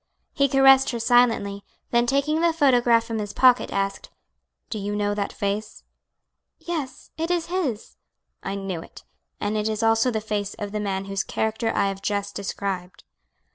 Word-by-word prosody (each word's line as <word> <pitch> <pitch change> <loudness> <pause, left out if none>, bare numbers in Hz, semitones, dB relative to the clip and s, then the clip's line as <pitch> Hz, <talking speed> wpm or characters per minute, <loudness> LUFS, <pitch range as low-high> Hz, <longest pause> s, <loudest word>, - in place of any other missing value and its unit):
He 280 0 +2
caressed 270 0 +6
her 235 - -3
silently, 225 -4 +2 0.3
then 240 0 +3
taking 280 +4 +1
the 335 -1 +3
photograph 245 -6 +4
from 225 -1 -4
his 205 -1 -5
pocket, 255 -1 +4
asked, 195 0 -2 0.6
"Do 215 - -3
you 205 +1 -3
know 205 0 0
that 205 -1 -2
face?" 205 +1 -4 0.7
"Yes, 310 -7 -5
it 330 +1 -1
is 350 -2 0
his." 275 - -3 0.4
"I 195 - -4
knew 195 -4 -4
it, - - -14 0.4
and 205 +1 -2
it 215 0 0
is 215 0 -2
also 225 +2 +3
the 220 -3 -1
face 210 -2 -3
of 205 -2 -6
the 210 - -3
man 195 -2 -2
whose 195 0 -2
character 220 +1 -1
I - - +2
have 195 0 -6
just 200 0 -2
described." 195 -2 -4
215 Hz, 175 wpm, -24 LUFS, 200-250 Hz, 0.7 s, caressed